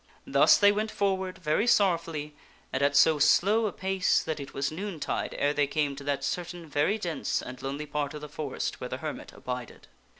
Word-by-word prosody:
Thus - - +5
they 205 0 +6
went 215 +2 -1
forward 190 -3 -1
very 170 +7 0
sorrowfully 165 -8 +1 0.4
and 130 - 0
at 145 0 +2
so 150 +2 +5
slow 215 +8 +4
a - - -2
pace 190 +1 +1
that 155 -1 -3
it 140 - -7
was 140 +1 -2
noontide 180 -1 -3
ere 145 +1 +2
they 145 -1 +2
came 145 -1 -1
to 140 - -9
that 145 -1 -1
certain 175 -1 -4
very 150 +8 +1
dense 175 -6 -2
and 125 +1 -8
lonely 140 +3 -4
part 145 0 -3
of 150 - -7
the 150 - -6
forest 150 -2 -4
where - - -4
the - - -4
hermit - - -6
abided. 125 -1 -7
155 Hz, 200 wpm, -28 LUFS, 145-190 Hz, 0.4 s, they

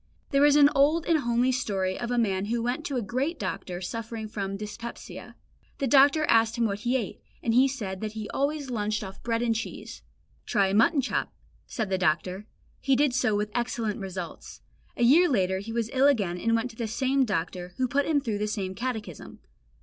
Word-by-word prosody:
There 280 +1 +5
is 290 - +4
an 290 -1 +8
old 300 +4 +3
and 330 -2 +3
homely 240 0 +1
story 195 -7 -1
of 240 - -3
a 245 - 0
man 195 -4 +1
who 230 +2 -1
went 245 +6 -2
to 280 - -3
a 245 - -1
great 265 - -2
doctor 180 -9 -4
suffering 225 +3 -5
from 195 -2 -4
dyspepsia. 210 +3 -8 0.4
The 275 - -1
doctor 280 +4 +5
asked 225 -3 +3
him 235 - +2
what 200 -2 -1
he 245 +4 +1
ate, 220 -7 -5 0.2
and 230 - +1
he 255 +3 +5
said 205 -9 -5
that 215 -1 -4
he 215 -1 -5
always 280 -1 -1
lunched 215 -2 -1
off 195 0 -9
bread 230 0 -1
and 230 -1 +2
cheese. 225 +1 -6 0.5
"Try 200 -3 +2
a - - -1
mutton 235 +8 +4
chop," 265 - -2 0.4
said 215 -5 -3
the 190 - +1
doctor. 180 +4 0 0.3
He 270 -1 +2
did 285 -1 +2
so 245 -4 +2
with 210 +1 -1
excellent 235 -3 -2
results. 185 -3 -7 0.4
A - - +1
year 320 +9 +6
later 190 -6 +1
he 210 +3 -7
was 230 -1 -2
ill 270 +1 +4
again 200 -11 +1
and 230 +4 +1
went 230 +2 -1
to - - -17
the 230 - -2
same 265 +4 +1
doctor, 180 -4 -3
who 255 - +1
put 280 +3 0
him 310 -2 +3
through 220 -6 -2
the 210 - -1
same 195 -3 -3
catechism. 220 -5 -5
230 Hz, 210 wpm, -27 LUFS, 200-260 Hz, 0.5 s, an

